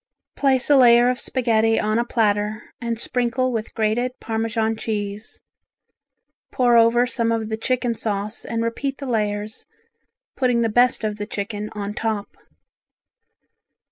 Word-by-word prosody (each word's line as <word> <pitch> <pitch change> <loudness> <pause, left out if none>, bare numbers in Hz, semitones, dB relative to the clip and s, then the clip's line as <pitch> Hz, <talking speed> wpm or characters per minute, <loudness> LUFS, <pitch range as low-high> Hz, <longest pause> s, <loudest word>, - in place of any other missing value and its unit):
Place 265 -2 +2
a - - +7
layer 240 -2 +6
of 250 - -4
spaghetti 225 -4 +1
on 215 +1 0
a - - +2
platter 215 -2 -1
and 235 -1 -2
sprinkle 250 +1 0
with 225 -2 -4
grated 235 +4 -1
Parmesan 225 0 -1
cheese, 210 -1 -5 1.1
pour 245 -2 +3
over 235 +1 +5
some 230 -2 -1
of 225 -1 -2
the 220 - -1
chicken 245 +1 -1
sauce 215 -1 -2
and 230 0 -2
repeat 270 +4 -3
the 280 - -7
layers, 210 -3 -2 0.7
putting 250 -3 +1
the 230 - +1
best 245 +1 +3
of 210 -1 -2
the 205 0 -5
chicken 210 0 -4
on 205 -1 -4
top. 215 -2 -3
230 Hz, 140 wpm, -22 LUFS, 215-245 Hz, 1.1 s, a